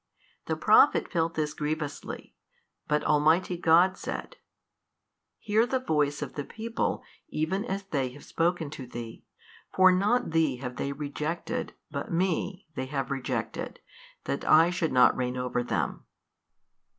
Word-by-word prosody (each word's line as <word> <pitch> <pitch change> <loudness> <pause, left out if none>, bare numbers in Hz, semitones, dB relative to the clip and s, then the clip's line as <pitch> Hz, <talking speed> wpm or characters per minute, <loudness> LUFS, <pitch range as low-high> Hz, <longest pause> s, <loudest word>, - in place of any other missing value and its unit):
The - - 0
Prophet - - +5
felt 165 -2 0
this 150 -1 -1
grievously 150 -1 -4 0.5
but 150 0 +1
Almighty 160 +5 +3
God 175 +2 +4
said, - - -5 1.0
Hear 220 +3 +2
the 260 - +1
voice 150 - 0
of - - -7
the 145 - -4
people 225 +8 -3 0.3
even 185 - -1
as 200 -4 -3
they 140 -9 -1
have 145 - -13
spoken 165 -3 0
to 135 -4 -8
thee, 115 -1 -8 0.5
for 185 0 +6
not 210 +5 +2
thee 160 -4 +2
have 125 0 -6
they 140 - -2
rejected 150 +3 -3 0.2
but - - -4
Me 180 +2 -1
they 130 -2 -4
have 135 -1 -3
rejected 135 -2 -3 0.4
that - - -3
I 165 +3 +6
should 175 -3 -1
not 125 -1 +5
reign 125 0 -2
over 125 -1 -1
them. 105 -10 -2
155 Hz, 140 wpm, -28 LUFS, 140-180 Hz, 1.0 s, for